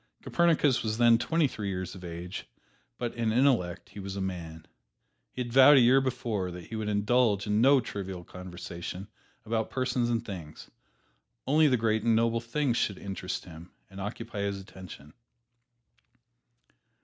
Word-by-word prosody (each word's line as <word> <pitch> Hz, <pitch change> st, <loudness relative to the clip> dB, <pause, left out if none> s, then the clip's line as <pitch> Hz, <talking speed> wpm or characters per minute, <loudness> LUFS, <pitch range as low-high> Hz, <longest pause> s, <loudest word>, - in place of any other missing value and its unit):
Copernicus 160 Hz, -6 st, +2 dB
was 110 Hz, -1 st, -2 dB
then 115 Hz, -1 st, +5 dB
twenty 160 Hz, +5 st, +2 dB
three 105 Hz, -5 st, -5 dB
years 95 Hz, -2 st, -4 dB
of 95 Hz, -1 st, -11 dB
age, 85 Hz, +2 st, -7 dB, 0.5 s
but 120 Hz, -1 st, -3 dB
in 115 Hz, -2 st, -1 dB
intellect 115 Hz, -8 st, +1 dB
he 105 Hz, -, -10 dB
was 95 Hz, 0 st, -6 dB
a -, -, -4 dB
man. 85 Hz, -4 st, -5 dB, 0.7 s
He 125 Hz, -, -3 dB
had 120 Hz, -1 st, -8 dB
vowed 135 Hz, +2 st, +8 dB
a -, -, +7 dB
year 130 Hz, +3 st, +5 dB
before 120 Hz, -7 st, -2 dB
that 90 Hz, 0 st, -8 dB
he 115 Hz, -, -7 dB
would 110 Hz, -1 st, -3 dB
indulge 105 Hz, 0 st, +2 dB
in 105 Hz, +1 st, +1 dB
no 135 Hz, +2 st, +6 dB
trivial 95 Hz, -6 st, -6 dB
conversation 90 Hz, +1 st, -8 dB, 0.4 s
about 110 Hz, 0 st, -1 dB
persons 130 Hz, -2 st, 0 dB
or 120 Hz, -, +2 dB
things 90 Hz, -9 st, -9 dB, 0.7 s
only 150 Hz, +3 st, +4 dB
the 130 Hz, -3 st, +3 dB
great 110 Hz, -1 st, +1 dB
and 115 Hz, 0 st, +3 dB
noble 115 Hz, +1 st, +2 dB
themes 120 Hz, +1 st, -1 dB
should 100 Hz, -, 0 dB
interest 95 Hz, -2 st, -5 dB
him 85 Hz, 0 st, -11 dB, 0.2 s
and 95 Hz, 0 st, -8 dB
occupy 110 Hz, +2 st, -6 dB
his 100 Hz, -1 st, -2 dB
attention. 90 Hz, -6 st, -12 dB
110 Hz, 160 wpm, -29 LUFS, 95-120 Hz, 0.7 s, vowed